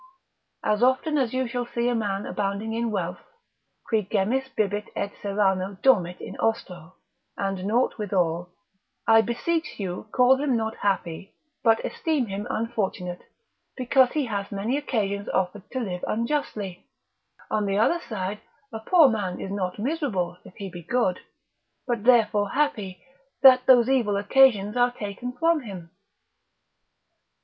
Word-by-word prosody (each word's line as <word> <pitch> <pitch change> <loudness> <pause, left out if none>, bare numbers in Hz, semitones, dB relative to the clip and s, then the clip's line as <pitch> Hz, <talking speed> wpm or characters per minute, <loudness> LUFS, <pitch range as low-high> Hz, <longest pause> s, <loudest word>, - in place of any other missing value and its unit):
As 210 +1 +1
often 260 +4 +2
as 250 -4 0
you 255 0 -1
shall 245 0 -3
see 235 0 -1
a 245 - +2
man 205 -3 -2
abounding 205 +2 -2
in 230 +1 -1
wealth, 180 -4 -3 0.7
qui 220 -2 +2
gemmis 225 +7 -1
bibit 205 0 0
et 200 0 -2
Serrano 195 -1 0
dormit 185 -10 +3
in - - -8
ostro, 185 -5 -2 0.4
and 195 -2 -2
naught 235 +3 +1
withal, 180 -4 0 0.6
I 225 0 +6
beseech 320 +9 -2
you 185 +1 -4
call 250 +1 +5
him 270 -3 +1
not 220 0 -3
happy, 190 -2 -2 0.3
but 225 -2 +3
esteem 310 -6 -1
him 205 +2 -5
unfortunate, 210 -7 -3 0.6
because 255 0 +3
he 300 -3 0
hath 200 -4 -4
many 205 +6 -1
occasions 205 -8 -2
offered 190 +1 -2
to 260 - -3
live 185 -7 -4
unjustly; 220 -6 -3 0.6
on 210 -1 0
the 195 0 0
other 285 +11 +3
side, 210 - -5 0.3
a 220 - -4
poor 320 +7 +5
man 205 -7 -2
is 195 - -5
not 185 -3 -3
miserable, 230 - -2
if - - -15
he 200 - -6
be 175 -2 -9
good, 190 0 0 0.7
but 235 -4 -2
therefore 215 -4 +4
happy, 205 -11 -1 0.4
that 255 -1 +8
those 245 -3 +7
evil 235 -7 +2
occasions 210 -1 +4
are 245 0 +4
taken 235 +1 -6
from 330 +5 +2
him. 185 -8 -9
215 Hz, 145 wpm, -25 LUFS, 195-250 Hz, 0.7 s, that